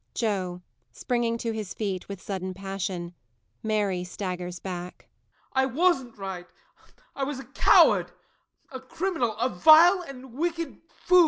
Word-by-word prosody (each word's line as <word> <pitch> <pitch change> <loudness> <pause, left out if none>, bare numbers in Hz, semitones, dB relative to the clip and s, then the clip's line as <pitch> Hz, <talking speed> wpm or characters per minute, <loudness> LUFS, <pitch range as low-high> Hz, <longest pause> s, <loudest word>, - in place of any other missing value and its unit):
JOE. 185 -5 -2 0.3
[Springing 235 -2 -1
to 230 0 -2
his 215 -4 -5
feet, 195 -4 -3
with 200 -2 -6
sudden 185 -2 -4
passion. 190 -2 -4 0.5
MARY 205 -4 0
staggers 180 -1 -5
back.] 180 -1 -7 0.5
I 265 0 +3
wasn't 265 -4 +1
right 190 -3 -6 0.7
I 275 - -2
was 280 0 -2
a 265 - -8
coward, - - +5 0.6
a 260 - -6
criminal 260 - -2
a 240 +3 +1
vile 320 - +7
and 265 -6 -10
wicked 335 +1 -3
fool. 360 +1 +3
220 Hz, 135 wpm, -27 LUFS, 185-270 Hz, 0.7 s, vile